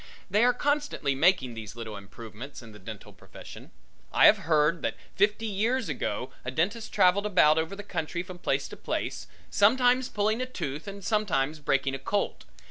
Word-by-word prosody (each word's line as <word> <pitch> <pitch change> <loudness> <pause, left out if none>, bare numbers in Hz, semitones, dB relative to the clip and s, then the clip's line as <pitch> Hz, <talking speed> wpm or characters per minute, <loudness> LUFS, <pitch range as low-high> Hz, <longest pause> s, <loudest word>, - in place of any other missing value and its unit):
They 210 +4 +4
are 250 - +6
constantly 285 - 0
making 135 -4 +3
these 110 -2 -8
little 115 -3 -6
improvements 115 +6 -10
in 115 - -12
the 105 - -13
dental 95 - -10
profession. - - -12 0.4
I - - +5
have - - +7
heard 155 +2 +3
that - - -2 0.2
fifty 210 +3 +2
years 220 +2 0
ago 125 -3 -3
a 125 - -4
dentist 200 - -1
traveled 190 +3 +3
about 160 -6 +5
over 160 +5 -3
the 205 - -8
country 170 -2 -3
from 180 -1 -10
place - - 0
to - - -10
place, - - -3 0.2
sometimes 250 +4 +4
pulling 215 +3 0
a 255 - -2
tooth 150 - -5
and 200 0 -7
sometimes 160 -9 0
breaking 135 -2 0
a 135 - -4
colt. 200 +9 -2
180 Hz, 180 wpm, -28 LUFS, 135-210 Hz, 0.4 s, have